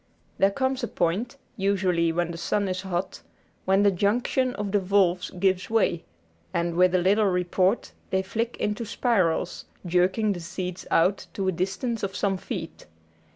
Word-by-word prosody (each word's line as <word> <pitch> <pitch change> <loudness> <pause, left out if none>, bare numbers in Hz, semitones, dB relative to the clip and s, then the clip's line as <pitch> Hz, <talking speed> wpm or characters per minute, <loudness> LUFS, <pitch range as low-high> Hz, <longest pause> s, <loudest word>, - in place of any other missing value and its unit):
There 195 - +5
comes 260 +4 -1
a - - 0
point, 210 +12 -1 0.2
usually 185 -4 +1
when 170 +1 -1
the 165 - -6
sun 200 +3 0
is 185 0 -2
hot, 185 -1 -3 0.4
when 195 +2 +3
the 200 - +5
junction 240 +7 +1
of 205 -1 -3
the 205 - +3
valves 185 -2 +2
gives 185 +1 0
way, 215 -7 +1 0.5
and, 170 0 0
with 180 +1 +4
a - - +6
little 200 +4 +3
report, 185 +3 +1 0.2
they 190 0 +1
flick 225 +5 -3
into 210 +3 -2
spirals, 215 -7 0 0.2
jerking 185 +5 +2
the 180 - -6
seeds 180 +1 -5
out 185 +4 +2
to 195 -1 -1
a - - +3
distance 195 +6 -2
of 195 0 -3
some 195 -2 0
feet. - - -7
190 Hz, 165 wpm, -26 LUFS, 180-210 Hz, 0.5 s, a